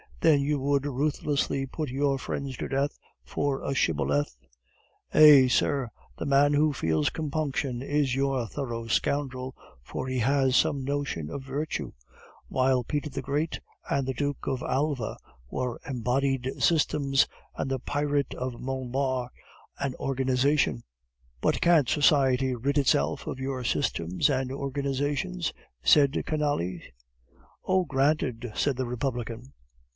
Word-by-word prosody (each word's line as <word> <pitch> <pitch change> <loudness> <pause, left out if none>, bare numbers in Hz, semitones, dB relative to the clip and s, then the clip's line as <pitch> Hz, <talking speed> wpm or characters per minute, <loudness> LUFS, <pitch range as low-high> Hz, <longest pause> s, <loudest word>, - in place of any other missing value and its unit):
Then 155 -4 +5
you 145 +1 0
would 140 +1 +1
ruthlessly 140 0 0
put 150 +1 -4
your 135 +1 +1
friends 135 0 -4
to - - -3
death 140 +2 -1 0.3
for 140 -1 -2
a 140 - -1
shibboleth?" 75 - +1 0.8
"Eh, 145 -4 +9
sir! 130 0 +1 0.3
the - - -4
man 140 +1 +4
who 150 +1 +3
feels 80 - +1
compunction 145 -5 -2
is 140 -2 0
your 135 -3 0
thorough 120 -3 -4
scoundrel, 130 +1 -1 0.3
for 130 - -5
he 130 -1 -1
has 135 +1 +2
some 140 -1 +2
notion 140 - -2
of 140 - -6
virtue; 140 +4 -3 0.6
while 130 -1 +2
Peter 150 +5 -2
the 135 0 -4
Great 150 +4 -1 0.3
and 135 -1 0
the 130 - -1
Duke 145 +2 -3
of 130 -2 -1
Alva 135 -4 -1 0.3
were 125 -2 -3
embodied 130 +1 0
systems, 140 -4 +3 0.3
and - - -3
the 135 -1 -1
pirate 145 +1 -1
Monbard 130 0 -2 0.5
an 135 -2 -2
organization." 130 - +1 0.6
"But - - +1
can't 160 -8 +4
society 135 -3 +3
rid 140 +5 -1
itself 80 - +2
of 130 - -4
your 130 -1 -3
systems 90 - 0
and 130 -2 0
organizations?" 140 - -2 0.3
said 140 - +5
Canalis. 145 - -1 0.8
"Oh, 185 -1 +2
granted!" 135 -5 0
cried 140 -2 +1
the 130 - -1
Republican. 120 0 -4
135 Hz, 130 wpm, -27 LUFS, 125-145 Hz, 0.8 s, Eh